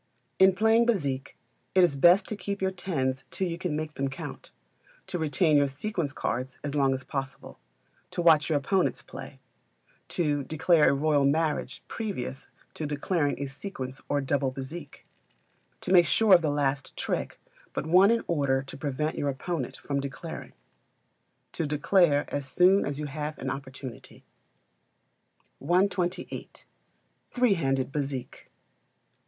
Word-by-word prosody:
In 190 0 +6
playing 225 +3 +4
Bézique, 140 - -1 0.4
it 185 - +6
is 170 -5 +3
best 175 +7 +6
to 215 - -4
keep 200 0 -4
your 190 0 0
tens 135 -8 -2
till 190 - -2
you 170 0 -4
can 180 -4 -2
make 155 0 -4
them 135 -1 -1
count; 135 - -8 0.5
to 175 - -4
retain 155 0 +3
your 145 0 +4
sequence 150 +2 -3
cards 130 -1 -3
as 145 -1 -3
long 135 -2 +2
as 130 - -7
possible; 135 0 -6 0.5
to - - -7
watch 160 -3 +5
your 155 - +3
opponent's 185 +7 0
play; - - -10 0.7
to 145 -5 0
declare 160 +2 +3
a - - +3
royal 145 0 +2
marriage 150 +2 0
previous 195 - -4 0.3
to 155 - -4
declaring 145 +1 -1
a 140 - -2
sequence 135 -2 -6
or 145 0 +1
double 135 0 0
bezique; 140 +3 -8 0.8
to - - -4
make 175 -2 +7
sure 220 -3 +4
of 175 - +8
the 155 - 0
last 140 -1 -1
trick - - -3 0.3
but - - -3
one 180 +5 +6
in 230 0 +2
order 140 -5 +1
to 135 - -10
prevent 150 +2 -2
your 145 - 0
opponent 140 +1 -4
from 140 -1 -2
declaring; 140 +4 -7 1.0
to 160 - -2
declare 150 0 +3
as 145 -2 -2
soon 185 +7 +4
as 145 0 -3
you 150 - -3
have 150 +1 -4
an 135 - -3
opportunity. 130 -2 -8 1.4
128. 180 +3 -1 0.6
Three 245 -4 +3
Handed 135 -6 0
Bezique. 135 -3 -5
150 Hz, 150 wpm, -28 LUFS, 135-180 Hz, 1.4 s, of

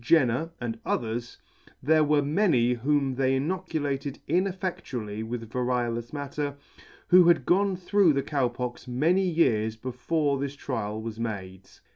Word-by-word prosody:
Jenner, 140 +1 +3
and 115 -2 -4
others, 115 +1 -3 0.5
there 155 +2 +4
were 150 -1 +3
many 145 - +2
whom 135 +2 +1
they 130 0 +1
inoculated 145 -3 -2
ineffedtually 170 - -2
with 115 0 -5
variolous 120 -1 -1
matter, 145 0 -4 0.5
who 180 -1 +8
had 170 -1 +4
gone 195 +1 +3
through 185 -1 +3
the 140 -1 0
Cow 140 -3 0
Pox 125 +1 -6
many 155 +10 +2
years 110 -10 +2
before 140 +5 -1
this 140 0 -3
trial 110 -6 -4
was 110 0 -6
made. 95 -4 -5
135 Hz, 135 wpm, -27 LUFS, 120-160 Hz, 0.5 s, who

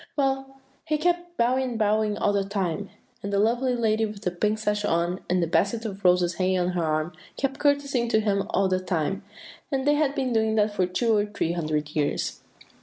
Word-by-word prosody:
Well, 270 -1 -1 0.3
he 305 -1 +1
kept 350 +2 -1
bowing 250 +3 +2
and 245 -3 -3
bowing 215 -1 +1
all 205 - +1
the 200 -1 +1
time, 195 -1 -2 0.3
and 200 - -4
the 200 - +1
lovely 240 +5 +2
lady 225 -2 +1
with 210 0 -9
the 180 - 0
pink 210 +5 0
sash 210 -1 -1
on, 175 0 0
and 180 0 +2
the - - 0
basket 205 +6 +1
of 200 -2 -6
roses 180 -1 +4
hanging 185 +1 +1
on 180 -1 +1
her 180 -2 -1
arm, 155 +2 -1 0.2
kept 275 0 -2
courtesying 280 -4 +1
to 220 - +3
him 200 -2 0
all 195 - +2
the 185 0 +1
time; 185 0 -1 0.5
and 270 -1 0
they 295 - +4
had 295 -2 +1
been 260 -4 -1
doing 220 -1 +2
that 210 -1 +2
for 185 -3 +1
two 225 +5 +1
or 205 0 +1
three 205 -5 -2
hundred 155 -3 -2
years." 145 -2 -1
210 Hz, 215 wpm, -26 LUFS, 185-245 Hz, 0.5 s, roses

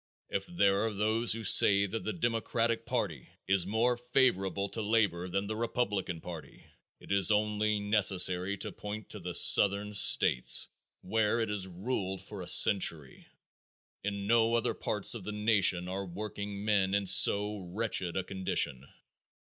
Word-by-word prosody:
If 95 - -4
there 100 - 0
are - - -4
those 110 +3 0
who 115 0 -7
say 100 0 +6
that 110 +3 -6
the 110 - -3
democratic 115 0 -2
party - - -4 0.2
is 95 -2 0
more 115 +4 0
favorable 120 -6 0
to 110 - -5
labor 100 -5 -1
than 95 +3 -3
the 110 +2 -5
republican 105 -7 -3
party 85 -3 -11 0.3
it - - -13
is 100 0 +5
only 105 0 0
necessary 100 -2 +1
to - - -6
point 105 +1 -9
to 105 - -7
the 90 -1 -6
southern 100 +3 +4
states 65 -10 +4 0.3
where 110 +3 -1
it 110 -2 -2
has 100 -2 -3
ruled 95 0 -5
for 100 0 -10
a 90 - -8
century. 85 -9 +2 0.8
In 100 0 -5
no 115 +1 +2
other 115 - -1
part 105 -2 -2
of 115 -5 -7
the 105 - -6
nation 100 -4 +1
are 95 +2 -5
workingmen 100 +1 -3
in 100 -1 -1
so 105 +2 +4
wretched 95 -4 -4
a 95 - -2
condition. 90 -8 -2
100 Hz, 155 wpm, -29 LUFS, 95-110 Hz, 0.8 s, say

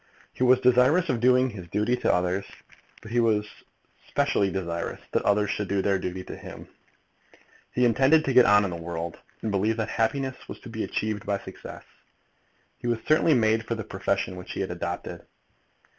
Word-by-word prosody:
He - - -13
was 125 0 +5
desirous 130 +8 +4
of 125 -4 +1
doing 125 +1 +4
his 95 -5 -9
duty 105 +7 0
to - - +1
others, 90 +2 0 0.6
but 110 - -10
he 120 - +2
was 110 -3 +2 0.6
specially 100 - +1
desirous 85 -3 -4
that - - +1
others 100 0 +2
should 105 -1 -2
do 100 0 0
their 100 -1 +1
duty 90 0 -4
to - - -8
him. - - -10 1.0
He 125 - +2
intended 135 +7 +4
to 135 - 0
get 125 -1 +7
on 105 0 +6
in 100 - -2
the - - -4
world, 85 0 -5 0.3
and 110 - -1
believed 105 +3 +1
that 110 - -2
happiness 130 +3 -2
was - - -7
to 120 - -10
be 110 -1 -4
achieved 105 -1 -3
by 100 -1 +1
success. - - -10 1.0
He - - -5
was 120 -1 +1
certainly 155 0 +4
made 110 -1 +2
for 115 - -1
the 110 - -5
profession 95 -1 -2
which 90 - -8
he - - -3
had 95 - -3
adopted. 85 0 -5
110 Hz, 190 wpm, -26 LUFS, 95-125 Hz, 1.0 s, get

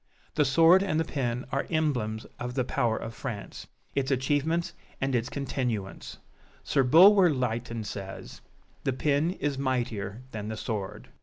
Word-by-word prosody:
The 150 - +3
sword 165 +7 +6
and 190 -5 0
the 160 - +1
pen 125 -3 -2
are 140 - -1
emblems 125 -9 0
of 125 +1 -4
the 130 - +1
power 115 -2 0
of 115 - -6
France 115 -5 -6 0.3
its 135 -1 0
achievements 145 +5 0 0.3
and 135 0 -1
its 120 0 0
continuance; 125 -8 -3 0.5
Sir 135 - +2
Bulwer 180 +8 +7
Lytton 120 -4 -2
says, 100 -2 -7 0.4
"The 135 - 0
pen 145 +4 +1
is 145 -7 -2
mightier 120 -5 -2
than 105 -1 -5
the 110 0 -4
sword!" 105 -4 -5
130 Hz, 150 wpm, -28 LUFS, 115-145 Hz, 0.5 s, Bulwer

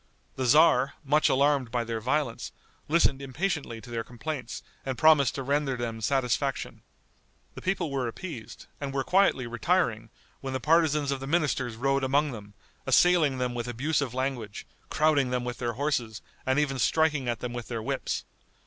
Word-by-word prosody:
The 130 - -2
tzar, 140 -1 +5
much 150 +3 +3
alarmed 140 -2 +2
by 120 0 -1
their 115 -1 -4
violence, 130 0 -1 0.4
listened 150 -4 +3
impatiently 140 -3 -3
to 120 - -12
their 115 -1 -2
complaints 125 +1 -6 0.2
and 130 -2 -3
promised 150 -2 +5
to 135 - -3
render 140 -1 0
them 115 -2 -4
satisfaction. 125 +1 -1 0.7
The - - -9
people 185 -5 -1
were 135 -3 -1
appeased, 130 - -8
and 140 -1 -5
were 135 - +1
quietly 185 -9 +3
retiring 120 -2 0 0.3
when 135 -1 -5
the 130 - -1
partisans 150 -1 +2
of 135 - -2
the 135 - -6
ministers 140 -7 0
rode 135 +3 0
among 140 +3 +2
them, 105 -3 -10 0.3
assailing 165 -7 +4
them 125 -1 -1
with 120 0 -4
abusive 135 +1 -1
language, 130 -6 -3 0.2
crowding 150 -4 +2
them 125 0 -1
with 125 0 -5
their 120 -1 -2
horses, 120 -5 -2 0.2
and 130 +1 +2
even 140 -3 0
striking 150 0 +2
at 120 -2 -2
them 125 -1 -5
with 120 -1 -6
their 115 -2 -4
whips. - - -2
135 Hz, 170 wpm, -27 LUFS, 120-150 Hz, 0.7 s, tzar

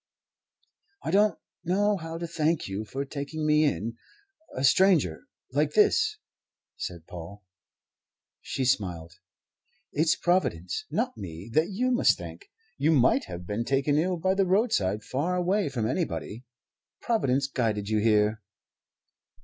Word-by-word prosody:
"I - - -2
don't 210 +2 +3 0.3
know 205 +4 +2
how 165 -2 -6
to 170 - -4
thank 165 -1 0
you 100 +3 -4
for 135 +7 -4
taking 145 +2 -5
me 150 0 +4
in, 115 -5 -2 0.6
a 130 - -2
stranger, 140 - +3 0.2
like 150 +2 +1
this," 430 - +3 0.6
said 85 -3 -6
Paul. 90 +4 -10 1.0
She 130 - -3
smiled. 90 -8 -1 0.7
"It's 155 +2 +3
Providence, 185 - 0
not 250 +3 -1
me, 90 +5 -8
that 160 +6 +3
you 250 +6 0
must 245 - +4
thank. 400 - -10 0.3
You 150 +3 +3
might 135 0 +3
have 90 -1 -8
been 105 +5 -2
taken 135 +3 +1
ill 180 +2 0
by 185 +3 +1
the 195 -1 +1
roadside 145 - +1
far 155 +8 -1
away 185 +1 +1
from 120 -5 -2
anybody. 110 +2 -3 0.5
Providence 140 - +1
guided 110 -6 -1
you 110 0 +1
here." 105 0 +2
140 Hz, 135 wpm, -27 LUFS, -, 1.0 s, me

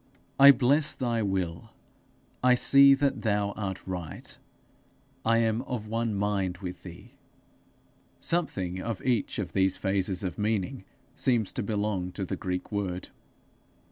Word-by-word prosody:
'I 140 +1 +10
bless 140 +5 +2
thy 120 -3 -1
will: 95 -5 -2 0.7
I 125 0 +6
see 140 +2 +7
that 140 0 0
thou 105 -2 0
art 95 -3 -5
right: 90 -4 -7 0.9
I 115 0 +3
am 115 0 +1
of 125 -5 -5
one 115 0 -2
mind 100 -3 -1
with 90 -2 -7
thee:' 90 -2 -12 1.1
something 95 - -2
of 115 -3 -5
each 120 -5 0
of - - -4
these 95 -1 +2
phases 95 -1 -1
of 90 -1 -4
meaning 105 +1 -2 0.3
seems 120 -6 +1
to - - -3
belong 100 -3 -2
to 100 - -4
the - - -3
Greek 90 0 -4
word. 95 -3 -3
105 Hz, 140 wpm, -28 LUFS, 95-120 Hz, 1.1 s, I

